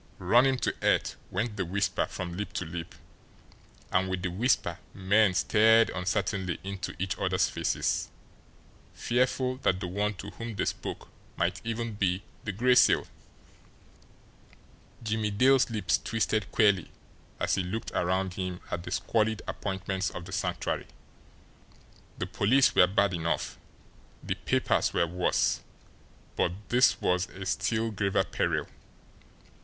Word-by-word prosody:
Run 120 Hz, +9 st, +4 dB
him 135 Hz, -1 st, +2 dB
to -, -, -1 dB
earth!" -, -, +2 dB
went 105 Hz, +3 st, -2 dB
the 95 Hz, -, 0 dB
whisper 100 Hz, +3 st, 0 dB
from 85 Hz, -2 st, -5 dB
lip 105 Hz, +3 st, -5 dB
to 95 Hz, -, -3 dB
lip; 85 Hz, +1 st, -7 dB, 1.0 s
and 95 Hz, 0 st, +2 dB
with 95 Hz, -1 st, -3 dB
the 90 Hz, -, -1 dB
whisper 95 Hz, -3 st, +1 dB, 0.2 s
men 100 Hz, 0 st, +3 dB
stared 110 Hz, +3 st, +5 dB
uncertainly 95 Hz, -1 st, -1 dB
into 100 Hz, 0 st, -5 dB
each 95 Hz, +1 st, -2 dB
other's -, -, +2 dB
faces, -, -, -1 dB, 0.9 s
fearful 125 Hz, +1 st, 0 dB
that 95 Hz, -8 st, +1 dB
the 95 Hz, -, -4 dB
one 105 Hz, +3 st, -1 dB
to 100 Hz, +2 st, -8 dB
whom 115 Hz, -1 st, -7 dB
they -, -, -1 dB
spoke -, -, -4 dB, 0.3 s
might 85 Hz, +2 st, 0 dB
even 115 Hz, 0 st, -3 dB
be 100 Hz, -1 st, 0 dB, 0.2 s
the 105 Hz, -, -1 dB
Gray 125 Hz, +6 st, +3 dB
Seal! 125 Hz, -, +5 dB, 2.0 s
Jimmie 110 Hz, -1 st, 0 dB
Dale's 130 Hz, +6 st, +4 dB
lips 90 Hz, -8 st, +1 dB
twisted 110 Hz, -4 st, -1 dB
queerly 100 Hz, -5 st, +3 dB, 0.5 s
as -, -, 0 dB
he -, -, +2 dB
looked 95 Hz, +5 st, -4 dB
around 95 Hz, +1 st, 0 dB
him 90 Hz, -1 st, -4 dB
at 90 Hz, -, -2 dB
the -, -, -7 dB
squalid 110 Hz, -1 st, 0 dB
appointments 95 Hz, -1 st, -2 dB
of 90 Hz, -, -8 dB
the -, -, -10 dB
Sanctuary. -, -, -2 dB, 1.3 s
The -, -, -2 dB
police 130 Hz, +6 st, +3 dB
were 90 Hz, -, +6 dB
bad 100 Hz, +1 st, +2 dB
enough, 80 Hz, -4 st, -2 dB, 0.6 s
the -, -, -1 dB
papers -, -, 0 dB
were -, -, +3 dB
worse; 90 Hz, +2 st, +1 dB, 0.7 s
but 85 Hz, -, +1 dB, 0.2 s
this 125 Hz, +1 st, +4 dB
was 90 Hz, 0 st, +1 dB
a 95 Hz, +1 st, -8 dB
still 100 Hz, +5 st, 0 dB
graver 100 Hz, -1 st, +1 dB
peril. -, -, -1 dB
100 Hz, 140 wpm, -29 LUFS, 90-110 Hz, 2.0 s, were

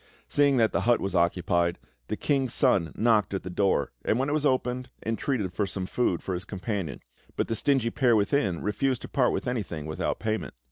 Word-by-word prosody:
Seeing 145 Hz, -2 st, +3 dB
that 110 Hz, -2 st, +3 dB
the -, -, 0 dB
hut 120 Hz, 0 st, +3 dB
was 95 Hz, -, -3 dB
occupied, 85 Hz, 0 st, +1 dB, 0.3 s
the -, -, -3 dB
King's 135 Hz, -4 st, 0 dB
Son 95 Hz, -, +3 dB
knocked 110 Hz, -4 st, +2 dB
at 95 Hz, -, -3 dB
the 95 Hz, -, -6 dB
door, 95 Hz, -7 st, +1 dB
and 110 Hz, -, +1 dB
when 135 Hz, +3 st, 0 dB
it -, -, 0 dB
was 150 Hz, -1 st, +2 dB
opened, 125 Hz, -1 st, -1 dB, 0.2 s
entreated 115 Hz, -3 st, -1 dB
for 105 Hz, -, 0 dB
some 95 Hz, -1 st, -4 dB
food 95 Hz, -4 st, 0 dB
for 95 Hz, -, -3 dB
his 90 Hz, +1 st, -3 dB
companion; 95 Hz, -, -4 dB, 0.3 s
but -, -, 0 dB
the -, -, -1 dB
stingy 130 Hz, -3 st, +1 dB
pair 125 Hz, -5 st, +3 dB
within 100 Hz, -, +1 dB
refused 130 Hz, +4 st, 0 dB
to -, -, -6 dB
part 130 Hz, -4 st, +2 dB
with -, -, -3 dB
anything 100 Hz, -11 st, -3 dB
without 80 Hz, 0 st, -2 dB
payment. 110 Hz, -, -3 dB
110 Hz, 205 wpm, -27 LUFS, 95-125 Hz, 0.3 s, Seeing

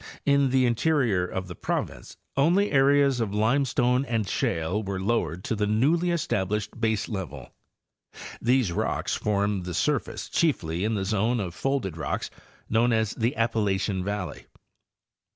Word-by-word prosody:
In 140 Hz, -1 st, +4 dB
the 130 Hz, 0 st, +3 dB
interior 120 Hz, -, +2 dB
of 95 Hz, +1 st, -4 dB
the 90 Hz, -, -7 dB
province -, -, -4 dB, 0.2 s
only 175 Hz, +9 st, +3 dB
areas 140 Hz, -1 st, +4 dB
of 105 Hz, -3 st, -2 dB
limestone 125 Hz, +2 st, +2 dB
and 115 Hz, -5 st, -1 dB
shale 85 Hz, +3 st, -1 dB
were 100 Hz, -2 st, -4 dB
lowered 95 Hz, -5 st, -1 dB
to -, -, -1 dB
the 105 Hz, 0 st, 0 dB
newly 145 Hz, +12 st, +2 dB
estab 155 Hz, -, 0 dB
lished 105 Hz, 0 st, -1 dB
baselevel. 105 Hz, -, -3 dB, 0.9 s
These 125 Hz, -5 st, +2 dB
rocks -, -, -1 dB
formed 100 Hz, -2 st, 0 dB
the 90 Hz, -2 st, -4 dB
surface 150 Hz, -, -1 dB
chiefly 90 Hz, -, 0 dB
in 110 Hz, +1 st, 0 dB
the 95 Hz, -2 st, -1 dB
zone 110 Hz, +4 st, +1 dB
of 90 Hz, -5 st, -3 dB
folded 125 Hz, -, -2 dB
rocks 80 Hz, -, -3 dB, 0.4 s
known 115 Hz, +2 st, +2 dB
as 110 Hz, -2 st, +1 dB
the 115 Hz, +2 st, -1 dB
Appalachian 105 Hz, -4 st, 0 dB
valley. 100 Hz, -1 st, -4 dB
110 Hz, 145 wpm, -26 LUFS, 95-130 Hz, 0.9 s, In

